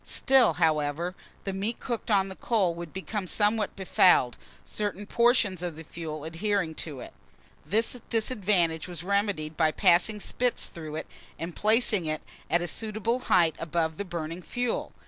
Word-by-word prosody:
Still, 265 -2 +4
however, 160 +1 +1 0.3
the 195 - -3
meat 205 +5 -2
cooked 235 -3 -4
on 195 -2 +3
the 190 - -8
coal 195 -7 +1
would 170 -1 -7
become 190 +1 -4
somewhat 210 +2 +1
befouled, 180 - +4 0.3
certain 205 -1 -3
portions 230 -5 +2
of 175 -3 -4
the 160 - -9
fuel 155 -2 -6
adhering 170 +1 -1
to 150 -5 -6
it. - - -10 0.5
This 230 +4 0
disadvantage 200 -8 +1
was 175 -2 -5
remedied 200 -6 -1
by 160 -1 +3
passing 185 +5 +3
spits 245 +4 0
through 155 -2 -8
it, 155 - -5 0.3
and 165 +1 -6
placing 215 -5 +3
it 155 0 -2 0.3
at 170 +1 +2
a - - -2
suitable 220 +6 -1
height 175 -9 +3
above 160 -1 -1
the - - -2
burning 170 -2 -5
fuel. 245 +6 -2
185 Hz, 160 wpm, -28 LUFS, 160-215 Hz, 0.5 s, Still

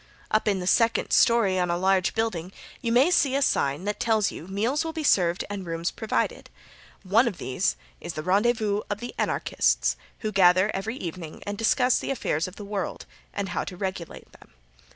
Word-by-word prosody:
Up 215 +1 +2
in 200 -2 +2
the 180 - -4
second 230 +5 +2
story 215 -6 +4
on 180 -1 0
a 170 - +1
large 190 0 +2
building 190 -6 -2 0.3
you 235 -3 -1
may 260 +9 +4
see 275 -6 +3
a 280 - +1
sign 140 - +1
that 205 +1 -3
tells 220 -3 +2
you 165 - -9
meals 225 +11 0
will 325 0 -4
be 320 -1 -4
served 175 - +2
and 200 -1 -5
rooms 165 0 -3
provided. 220 - -2 0.5
One 215 +6 +3
of 205 - -3
these 130 +11 -1 0.2
is 170 - -6
the 155 - -5
rendezvous 210 +2 +1
of 205 +3 -4 0.2
Anarchists, - - +1 0.2
who 215 -2 -2
gather 185 +1 +4
each 195 +2 -4
evening 175 -8 -6
and 205 - -3
discuss 250 +3 +2
the - - -5
affairs 185 - -1
of 185 - -10
the 205 - -8
world, 200 -2 -4 0.3
and 200 -1 -3
how 180 - -2
to 180 - -8
regulate 185 -3 -6
them. - - -19
200 Hz, 195 wpm, -26 LUFS, 180-225 Hz, 0.5 s, story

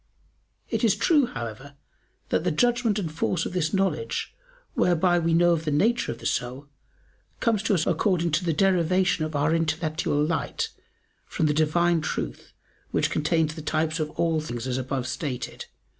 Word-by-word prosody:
It - - -1
is - - +4
true, 295 -7 +3
however, 125 - -7 0.5
that - - +1
the 180 - +1
judgment 240 +4 +2
and 175 -7 -2
force 165 +3 -1
of - - -4
this 165 -4 0
knowledge, 195 - -1 0.4
whereby 175 0 +3
we 165 0 +1
know 175 0 +5
the 160 -1 -3
nature 220 +12 +2
of - - -6
the - - -12
soul, 125 +3 -2 0.7
comes 225 -4 +1
to 215 -2 +1
us 155 - +1
according 175 -5 +1
to 155 +4 +1
the 170 - +1
derivation 180 0 +2
of 155 -1 -6
our 145 +2 +2
intellectual 160 -2 0
light 160 +1 -2 0.6
from 160 - -1
the 150 - +2
Divine 165 +2 +2
Truth - - -4 0.4
which - - 0
contains 155 0 +1
the 155 - -8
types 155 +1 -1
of 155 -1 -1
all 165 -2 +2
things 120 -5 -5
as 130 0 -1
above 130 0 -3
stated 130 -1 -4
(Q. - - -28
160 Hz, 175 wpm, -26 LUFS, 150-180 Hz, 0.7 s, know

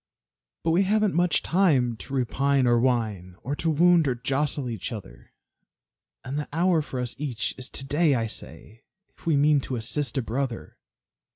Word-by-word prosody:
But 165 - +1
we 170 +4 +4
haven't 210 +1 +2
much 175 +1 +2
time 145 -10 +2
to 135 - -7
repine 135 +1 +1
or 120 -1 +4
whine, 110 -8 -1
Or 140 +4 -2
to 165 - 0
wound 170 0 +4
or 130 - +1
jostle 135 +2 -1
each 115 -1 -5
other; 65 - -10 0.9
And 135 +3 -3
the 150 - -4
hour 170 +1 +2
for 135 -3 -5
us 125 -1 -4
each 135 -6 -3
is 130 -1 -7
to 135 - -5
day, 145 +1 +2
I 115 -2 0
say, 110 0 -9 0.3
If - - -16
we 155 -3 +3
mean 145 0 +4
to 130 - -4
assist 125 +3 -1
a 130 - 0
brother. 120 +1 -4
135 Hz, 180 wpm, -26 LUFS, 120-155 Hz, 0.9 s, we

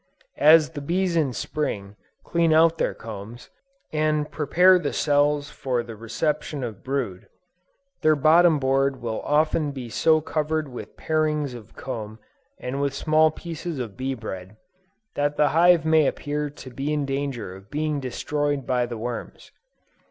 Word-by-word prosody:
As 155 +1 +6
the 150 -3 -6
bees 175 +4 0
in 150 -5 +2
Spring, 100 -4 -3 0.3
clean 170 -1 +2
out 165 +1 +4
their - - 0
combs, 110 +1 -9 0.4
and 155 -1 0
prepare 180 +4 +4
the 145 -5 -3
cells 145 0 +1
for 125 -3 -2
the 115 -1 -9
reception 145 - -2
of 110 -5 -6
brood, 130 -9 -3 0.7
their 155 0 +4
bottom 160 +3 +5
board 135 0 +1
will 115 -2 -3
often 155 0 +1
be 130 -4 -7
so 155 +7 +3
covered 155 0 -1
with 125 -2 -9
parings 155 -3 0
of 120 -3 -12
comb 110 -4 -6 0.4
and 130 +3 -4
with 140 -1 -1
small 155 +2 +3
pieces 165 0 -6
of 115 -6 -5
bee 130 +1 -3
bread, 95 -3 -8 0.6
that 145 0 -1
the 150 -1 +4
hive 170 +1 +5
may 160 -2 +4
appear 150 0 -2
to 135 -2 -11
be 135 +4 -3
in 150 -2 0
danger 135 -8 -3
of 95 +2 -15
being 150 0 -1
destroyed 145 +2 -2
by 125 -1 +1
the 120 -1 -6
worms. 120 +1 -6
145 Hz, 155 wpm, -24 LUFS, 125-155 Hz, 0.7 s, As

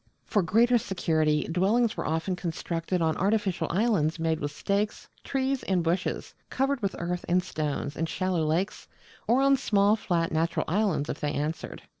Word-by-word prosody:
For 205 - +2
greater 235 +7 +4
security, 155 -6 +1
dwellings 210 +7 +2
were - - -3
often 165 +4 -1
constructed 170 0 -2
on 160 -1 +1
artificial 200 -1 +1
islands 180 -6 +1
made 160 -1 0
with 145 - -2
stakes, 200 +7 -2 0.2
trees, 270 0 -1
and 185 -3 0
bushes, 175 +3 -1 0.2
covered 270 -1 0
with 200 -2 -1
earth 175 +1 -3
and 180 +1 +3
stones, 145 -3 -3
in 165 - -1
shallow 185 -1 -1
lakes, 165 +6 -1 0.4
or 255 +4 +4
on 275 0 +5
small 205 -4 +3
flat 170 -6 -1
natural 165 +1 0
islands 180 -5 +1
if - - -4
they 150 -1 -1
answered. 155 +2 -4
180 Hz, 165 wpm, -27 LUFS, 160-210 Hz, 0.4 s, on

